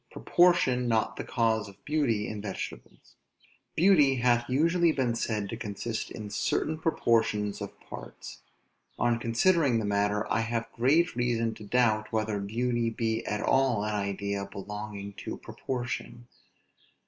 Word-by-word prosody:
PROPORTION 175 -9 +3
NOT 110 -2 +1
THE - - -5
CAUSE 110 -3 0
OF 100 - -18
BEAUTY 135 -9 +1
IN 105 -1 -5
VEGETABLES. 100 -2 -8 0.6
Beauty 155 -7 +5
hath 120 -1 +2
usually 165 +5 +3
been 130 -5 0
said 110 -3 -2
to - - -4
consist 110 +1 -4
in 105 -2 -7
certain 155 +8 -1
proportions 115 -9 +1
of - - -7
parts. - - -10 0.6
On 120 -1 +1
considering 130 +3 +3
the 110 - -1
matter, 105 +1 +1
I - - +2
have 115 0 -1
great 145 +8 +3
reason 115 -2 0
to 110 - -11
doubt, 110 -2 +2
whether 110 -2 -1
beauty 115 +3 0
be 115 0 -1
at 105 0 -1
all 130 -6 +2
an 105 - -2
idea 100 0 -2
belonging 100 0 -6
to - - -5
proportion. 120 -1 -5
115 Hz, 140 wpm, -29 LUFS, 105-125 Hz, 0.6 s, Beauty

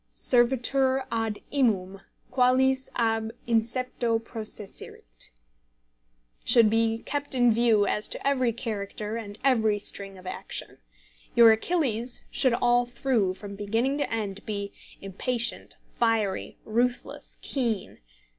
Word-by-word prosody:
"Servetur 260 +2 +2
ad 225 -2 -2
imum 195 -8 +1 0.3
Qualis 260 +1 +3
ab 225 -1 0
incepto 235 0 +1
processerit," 210 - -6 1.1
should 230 -3 +5
be 225 0 +1
kept 290 0 -2
in 245 -2 +5
view 225 -2 +4
as 210 +1 +2
to - - -4
every 255 -4 +2
character 215 -2 -4
and 205 -3 -6
every 220 -6 +3
string 195 -1 -5
of 185 - -14
action. 185 - -6 0.6
Your 230 -1 +9
Achilles 240 -2 0
should 255 -3 +3
all 245 0 +3
through, 240 -7 0
from 200 0 -8
beginning 225 +8 0
to 285 - -1
end, 205 -3 -3
be 200 -2 -4 0.3
"impatient, 235 +5 -2
fiery, 225 -5 0
ruthless, 240 +3 -1
keen." 235 -7 -2
230 Hz, 115 wpm, -27 LUFS, 210-250 Hz, 1.1 s, Your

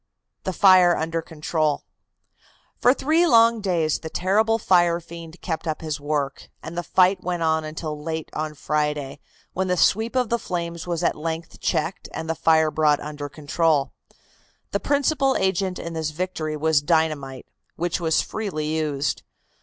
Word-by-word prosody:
THE 190 - 0
FIRE 185 -2 +6
UNDER 165 +1 -2
CONTROL. 155 -1 -1 1.0
For 245 - +5
three 315 +6 +2
long 230 -3 +5
days 170 -6 0
the 160 - -7
terrible 215 +7 +2
fire 175 -5 +3
fiend 170 0 -11
kept 165 -1 -4
up 155 - -2
his 155 -2 -3
work, 145 -2 -3
and 165 - -7
the 175 - -1
fight 185 +2 +3
went 175 -2 -2
on 160 0 +1
until 155 -1 -5
late 160 0 -4
on 155 0 -3
Friday, 150 -2 -2 0.3
when 190 +1 -1
the 180 0 +1
sweep 220 +8 +2
of 250 -3 +1
the 235 - +1
flames 170 -3 -4
was 170 -2 -2
at - - +2
length 160 +1 -5
checked 165 +4 -2
and 160 - -4
the 165 - 0
fire 160 -1 +3
brought 150 -2 +3
under 145 -1 -6
control. 150 0 0 0.8
The - - 0
principal 280 -1 +1
agent 190 -1 0
in 170 - -6
this 160 -1 -2
victory 155 -2 -3
was 155 -1 +2
dynamite, 150 -5 0 0.3
which 175 +1 -1
was 165 -2 +2
freely 155 -8 -3
used. 150 -3 -1
165 Hz, 160 wpm, -23 LUFS, 155-185 Hz, 1.0 s, FIRE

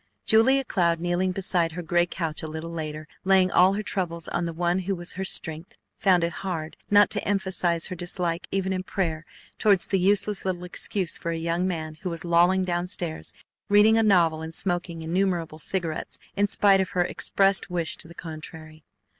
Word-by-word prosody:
Julia 260 +5 +4
Cloud, 170 -6 +1
kneeling 175 +2 0
beside 180 -3 +1
her 175 +1 -5
gray 175 +2 +2
couch 165 -3 -3
a 160 - -5
little 160 +2 -6
later, 155 -2 -5 0.2
laying 190 -1 +4
all 185 +2 +5
her 210 +2 -2
troubles 170 -5 -3
on 175 - -1
the 170 - -3
One 175 +2 0
who 190 +1 -2
was 175 0 -4
her 190 - -5
strength, 160 -2 -2 0.2
found 185 -3 +3
it 170 - 0
hard 165 -5 -4
not 205 0 +5
to - - +2
emphasize 185 -4 0
her 185 - -4
dislike 175 -1 -3
even 190 -1 -1
in 185 - -2
prayer 165 -4 -3 0.3
toward 200 -4 +4
the 195 - 0
useless 200 +2 +2
little 180 -2 -3
excuse 180 0 -3
for 170 - -4
a 165 - -2
young 170 +2 -1
man 155 -3 -4
who 185 - -3
was 170 0 -4
lolling 175 +2 +3
down 175 -1 -1
stairs 175 -4 -3 0.4
reading 210 +2 +6
a 225 - +4
novel 170 -7 +3
and 160 0 -6
smoking 175 -3 0
innumerable 170 -2 -1
cigarettes 165 -2 -3 0.2
in 205 +1 +2
spite 195 -1 +4
of 190 - -2
her 175 - +4
expressed 195 +2 +1
wish 170 -2 -1
to - - -6
the 170 - -13
contrary. 155 -1 -10
175 Hz, 195 wpm, -25 LUFS, 165-190 Hz, 0.4 s, reading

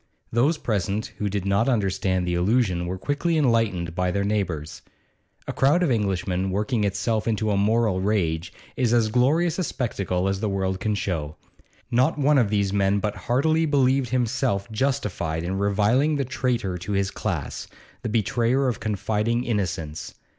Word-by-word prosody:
Those 135 +8 +2
present 105 -3 -2
who 105 - -1
did 100 -1 -3
not 100 +6 +2
understand 95 -5 0
the 90 - -1
allusion 90 -1 +1
were 95 +2 -3
quickly 145 - -1
enlightened 115 - +1
by 90 +1 0
their 100 +2 0
neighbours. 95 -7 -2 0.7
A - - -3
crowd 145 +8 +3
of 160 - +2
Englishmen 95 -4 0
working 105 +4 0
itself 105 +3 -1
into 110 -1 0
a - - +2
moral 105 -1 +2
rage 85 -5 0 0.2
is 120 -2 +1
as 115 -2 +3
glorious 150 - +2
a - - +1
spectacle 95 - -2
as 95 0 -1
the 105 0 -1
world 95 -1 -1
can 105 +1 -1
show. 80 -7 -3 0.6
Not 130 +7 +2
one 145 0 +4
of 115 -5 +2
these 100 -2 0
men 100 0 +2
but 105 +1 -2
heartily 155 +6 +1
believed 135 -3 +2
himself 120 -3 0
justified 105 - -1
in 95 +3 -2
reviling 105 +9 +2
the 140 -2 -1
traitor 120 -8 -1
to 95 +4 -4
his 100 0 0
class, - - -4 0.3
the 115 - -3
betrayer 120 +4 +1
of 120 -5 -1
confiding 110 +3 -1
innocence. 90 -9 -3
105 Hz, 165 wpm, -24 LUFS, 95-125 Hz, 0.7 s, one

